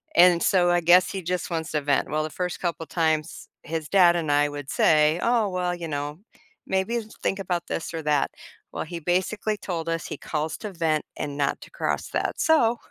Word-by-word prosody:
and 175 0 +6
so 180 -2 +3
I 175 0 +3
guess 175 +2 +5
he 190 - -4
just 180 +1 -2
wants 165 -2 -3
to 150 - 0
vent. 140 0 +1
Well, 155 0 0
the 155 - -4
first 180 +2 -4
couple 170 -2 -2
times, 160 -1 -1
his 160 -1 -4
dad 180 -3 +6
and 160 -4 -1
I 145 0 +4
would 145 -1 -7
say, 155 +1 +3
"Oh, 230 -3 +2
well, 180 -1 -1
you 170 -1 -6
know, 145 +1 -4 0.5
maybe 190 +5 0 0.2
think 195 - -1
about 175 -2 -2
this 165 - -4
or 165 - -3
that." 150 -2 +1 0.4
Well, - - -3
he 170 +1 -6
basically 185 +6 0
told 170 -5 -4
us 165 -1 -2
he - - -6
"calls 155 0 -3
to 210 - -6
vent 160 -3 0
and 145 -1 -4
not 140 -1 0
to - - -12
cross - - -2
that," - - -2
so 240 -8 +3
170 Hz, 210 wpm, -25 LUFS, 155-180 Hz, 0.5 s, and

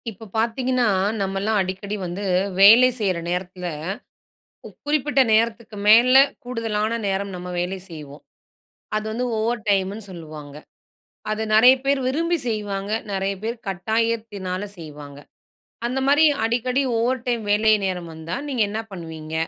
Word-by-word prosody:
இப்ப 220 +1 -11
பாத்தீங்கன்னா, 245 +2 +1 0.4
நம்மல்லாம் 195 +3 0
அடிக்கடி 190 +2 -4
வந்து 180 +3 -5 0.4
வேலை 225 +6 +9
செய்ற 190 -5 0
நேரத்தில, 180 0 -4 1.0
கு - - -9 0.2
குறிப்பிட்ட 295 -2 +2
நேரத்துக்கு 230 0 0
மேல 235 +4 +7 0.3
கூடுதலானா 225 -2 -2
நேரம் 195 +1 -2
நம்ம 180 0 -7
வேலை 180 +2 -2
செய்வோம். 150 -3 -10 0.7
அது 215 0 -1
வந்து 240 +3 -2
ஓவர் 230 +1 -1
டைம்னு 200 +2 0
சொல்லுவாங்க. 155 -5 -10 0.8
அத 215 +1 -1
நெறைய 245 +4 +8
பேர் 275 0 +2
விரும்பி 335 +5 0
செய்வாங்க, 205 -2 -3 0.2
நெறைய 195 0 -1
பேர் 230 +2 -2
கட்டாயத்தினால 205 -1 -2 0.2
செய்வாங்க. 145 -3 -10 0.7
அந்தமாரி 270 +5 +3 0.2
அடிக்கடி 250 +3 0 0.2
ஓவர் 245 +1 0
டைம் 240 -2 0
வேலை 215 +1 +4
நேரம் 180 -3 -4
வந்தா 160 +2 -5
நீங்க 255 -5 0
என்னா 215 +2 -3
பண்ணுவீங்க? 160 -3 -8
215 Hz, 125 wpm, -22 LUFS, 185-235 Hz, 1.0 s, வேலை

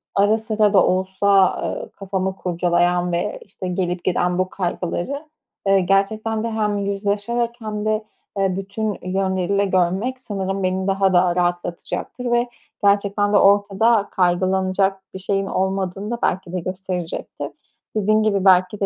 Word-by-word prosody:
ara 205 +2 +4
sıra 215 -2 +1
da 190 - +6
olsa, 190 +1 +2
ııı, - - -4
kafamı 190 -1 -3
kurcalayan 175 0 +1
ve, 175 +4 -2
işte, 190 -1 -8
gelip 180 -1 -2
giden 180 0 +1
bu 185 0 0
kaygıları, 185 - -3 0.4
eee, 195 0 +5
gerçekten 215 +4 +1
de 230 - -2
hem 210 -2 0
yüzleşerek 205 +4 -1
hem 215 -2 -4
de, 215 0 0 0.3
eee, 195 -2 +1
bütün 200 +2 -3
yönleriyle 190 +1 0
görmek 190 +7 0
sanırım 195 -4 -3
beni 185 +1 0
daha 195 -1 +2
da 175 -1 +4
rahatlatacaktır 175 +7 -2
ve 240 0 +2 0.3
gerçekten 205 0 +2
de - - +6
ortada 200 +2 +4
kaygılanacak 190 +1 +1
bir 190 - -6
şeyin 195 +1 -1
olmadığını 190 +2 -2
da 240 - -1
belki 180 -1 -1
de 185 - -1
gösterecektir. 185 -1 -5 0.5
Dediğin 215 +1 +3
gibi 200 -3 +1
belki 185 +1 +4
de 200 - +1
195 Hz, 145 wpm, -21 LUFS, 185-210 Hz, 0.5 s, da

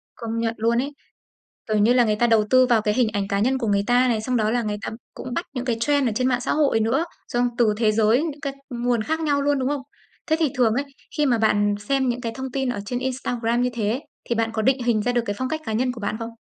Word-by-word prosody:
Công 230 -1 -4
nhận 230 0 0
luôn 230 +2 +1
ấy. 280 +4 -1 0.8
Kiểu 215 -1 +1
như 220 +4 +4
là, 250 -1 +4
người 215 -2 +1
ta 240 - +3
đầu 225 -2 +4
tư 255 0 +6
vào 230 -3 +3
cái 210 -1 +1
hình 245 -1 +3
ảnh 200 -1 -2
cá 200 - 0
nhân 260 +5 +2
của 235 - -2
người 200 -1 +2
ta 250 +1 +4
này, 225 -3 +1
xong 250 +3 -1
đó 215 -2 +1
là 240 +1 +1
người 210 -2 -2
ta - - -3 0.2
cũng 255 -2 -6
bắt 340 - -2
những 250 -1 -3
cái 240 -3 0
trend 285 0 +2
ở - - -1
trên 255 +3 +1
mạng 245 -1 +1
xã - - -1
hội 285 -7 +2
nữa, 240 +9 +1 0.2
xong 245 0 +1
từ 220 -3 +3
thế 215 -1 +2
giới 225 +5 +3
những 305 -3 -4
cái 275 -1 -4 0.2
nguồn 240 -2 0
khác 320 +6 -2
nhau 285 -3 +1
luôn, 285 0 +2
đúng 260 0 0
không? 285 -1 -2 0.4
Thế 315 - +2
thì 315 -3 +2
thường 235 -4 +3
ấy, 280 +3 0 0.3
khi 300 - +2
mà 240 -4 +2
bạn 205 -2 +2
xem 270 -2 +2
những 245 0 -1
cái 230 -2 -4
thông 265 -1 -5
tin 270 -1 -1
ở 240 -5 -2
trên 245 - -2
Instagram 245 -2 -1
như 250 - +1
thế, 230 +3 -1 0.2
thì 235 - -1
bạn 225 0 0
có 220 - -1
định 265 +2 +2
hình 225 -3 +2
ra 245 - 0
được 240 -1 +1
cái 205 - -1
phong 260 - -1
cách 315 +3 -3
cá 220 - -3
nhân 250 +3 0
của 235 - -9
bạn 205 +1 -2
không? 230 0 -5
240 Hz, 295 wpm, -23 LUFS, 225-260 Hz, 0.8 s, tư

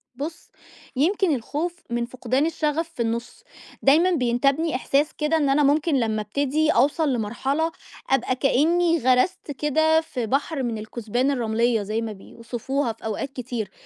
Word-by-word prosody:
بُص، 310 +6 -7 0.4
يمكن 335 +3 +2
الخوف 300 +8 -3
من 235 0 -1
فُقدان 255 +3 -1
الشَغَف 320 0 -1
في - - -3
النُص. 235 - -3 0.4
دايمًا 320 +7 +5
بينتابني 275 +2 +1
إحساس 280 +4 +1
كده 300 +1 +1
إن 290 -3 +1
أنا 285 +2 +3
ممكن 295 +2 +2
لمّا 220 -2 0
أبتدي 285 +8 0
أوصل 290 +2 +2
لمرحلة 265 +8 -1 0.4
أبقى 260 -1 +1
كإنّي 330 +6 +2
غَرَسْت 260 +6 +1
كده 315 +3 +2
في 255 -7 -4
بحر 275 +4 -1
من 235 -2 -2
الكُسبان 235 +4 -1
الرمليّة 230 -3 +1
زي 215 +3 -2
ما 225 -1 -4
بيوصفوها 235 +5 -4
في 220 - -15
أوقات 220 +5 -3
كتير، 240 -6 -4
270 Hz, 145 wpm, -24 LUFS, 235-310 Hz, 0.4 s, دايمًا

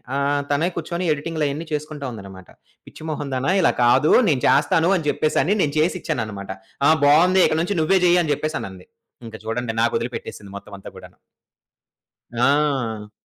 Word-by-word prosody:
ఆహ్, 140 +1 0
తనే 145 +4 +1
కూర్చొని 170 +2 -4
ఎడిటింగ్‌లయన్ని 150 0 -3
చేసుకుంటా 150 -1 -5
ఉందన్నమాట. 95 -4 -11 0.4
"పిచ్చి - - -13
మొహం 145 -2 -4
దాన 130 +1 -2
ఇలా - - +4
కాదు, 130 +5 +4 0.2
నేను 140 -7 +1
చేస్తాను" 165 +4 +3
అని 160 -4 -5
చెప్పేసని 155 +7 +1
నేను 145 - 0
చేసిచ్చానన్నమాట. 110 - -2 0.4
"ఆ! - - +6 0.2
బావుంది. 180 +6 +5
ఇక - - -1
నుంచి 190 +4 -2
నువ్వే 190 +4 +3
చెయ్యి" 175 0 +4
అని 150 - -2
జెప్పేసనంది. 100 - -5 0.4
ఇంక 115 -1 -9
చుడండి 115 +1 -3
నాకొదిలి 115 +1 0
పెట్టేసింది 100 -3 -9
మొత్తం 100 0 -10
అంతా 95 - -11
కూడాను. - - -14 1.2
ఆ! 125 -6 0
145 Hz, 150 wpm, -21 LUFS, 115-155 Hz, 1.2 s, ఆ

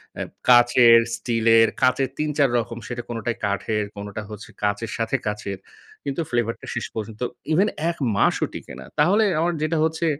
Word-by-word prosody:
অ্যা - - -3 0.3
কাচের, 120 -1 +7 0.2
স্টিলের, 115 -1 +4
কাঁচের 130 +1 +2
৩-৪ 150 -3 +1
রকম 115 0 -3
সেটা 120 0 -4
কোনটাই 115 0 -3
কাঠের, 105 +1 -1
কোনোটা 100 +1 -6
হচ্ছে 105 0 -9
কাঁচের 105 +2 -1
সাথে 115 -1 -1
কাচের। 100 -2 -3 0.5
কিন্তু 140 +4 -2
ফ্লেভার 120 -1 0
টা - - -10
শেষ 120 - -2
পর্যন্ত 110 +1 -6 0.3
ইভেন 195 +6 +3 0.2
১ 170 - -4 0.2
মাসও - - +2
টিকে - - -8
না। 65 - -9
তাহলে 195 +8 +4 0.2
আমার 170 +1 +1
যেটা 155 +1 0
হচ্ছে, 160 +1 0
120 Hz, 165 wpm, -23 LUFS, 110-140 Hz, 0.5 s, কাচের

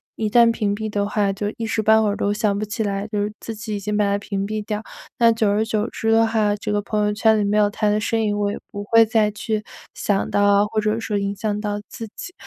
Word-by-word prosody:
一 220 - -1
旦 235 +2 +5
屏 210 -3 -1
蔽 220 +1 -4
的 205 -1 -1
话， 205 -1 +1
就 205 +1 -3
一 230 - -3
时 220 0 -1
半 220 +1 +5
会 210 - +2
儿 200 - -1
都 205 - 0
想 210 -2 0
不 215 - -2
起 220 +2 -3
来， 200 0 -2
就 210 -2 -2
是 210 - -3
自 225 - -6
己 215 0 -6
已 - - -5
经 210 +1 -3
把 210 - +2
他 200 0 +1
屏 200 -1 -3
蔽 215 +1 -3
掉。 210 -1 -3 0.4
那 230 -1 +6
久 225 -1 +1
而 210 +2 +2
久 220 0 -1
之 225 - -1
的 225 0 +4
话， 215 -2 +1
这 210 +1 -4
个 205 - +1
朋 210 0 -1
友 210 - 0
圈 220 +1 +3
里 210 - +1
没 205 +1 +1
有 210 -1 +4
他 210 +1 -1
的 210 - +2
身 225 +1 0
影， 205 -1 0
我 205 -1 0
也 - - -5
不 205 0 -6
会 225 +2 +5
再 215 -2 +2
去 215 0 -3 0.3
想 200 -2 -1
到 205 - +2
啊 205 0 +4
或 215 0 -1
者 215 +2 0
说 210 -2 -2
影 200 0 -1
响 210 +1 -2
到 205 -1 -2
自 225 - -7
己。 355 - -7
210 Hz, 310 characters per minute, -21 LUFS, 205-220 Hz, 0.4 s, 那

